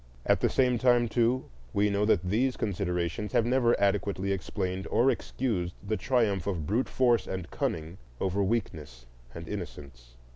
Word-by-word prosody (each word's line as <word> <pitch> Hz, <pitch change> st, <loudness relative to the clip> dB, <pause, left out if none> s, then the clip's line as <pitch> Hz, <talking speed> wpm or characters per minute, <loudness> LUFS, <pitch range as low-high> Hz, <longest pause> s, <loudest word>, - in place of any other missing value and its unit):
At -, -, +3 dB
the -, -, +2 dB
same 125 Hz, -2 st, +2 dB
time, 120 Hz, -1 st, +4 dB
too, 120 Hz, +3 st, +1 dB, 0.3 s
we 105 Hz, 0 st, +3 dB
know 100 Hz, +1 st, +1 dB
that 100 Hz, -5 st, +3 dB
these 120 Hz, +8 st, 0 dB
considerations 90 Hz, -1 st, -2 dB
have 115 Hz, -, +3 dB
never 120 Hz, -1 st, +2 dB
adequately 100 Hz, -1 st, 0 dB
explained 95 Hz, 0 st, -3 dB
or 130 Hz, +3 st, +3 dB
excused 110 Hz, -8 st, -2 dB
the 110 Hz, -, +1 dB
triumph 110 Hz, -8 st, +1 dB
of 85 Hz, -6 st, -2 dB
brute 110 Hz, -, 0 dB
force 120 Hz, -5 st, +2 dB
and 95 Hz, -3 st, -5 dB
cunning 80 Hz, +4 st, -3 dB, 0.2 s
over 95 Hz, +1 st, 0 dB
weakness 80 Hz, -, -3 dB, 0.3 s
and 85 Hz, 0 st, -7 dB
innocence. 70 Hz, -11 st, -8 dB
100 Hz, 155 wpm, -29 LUFS, 90-120 Hz, 0.3 s, time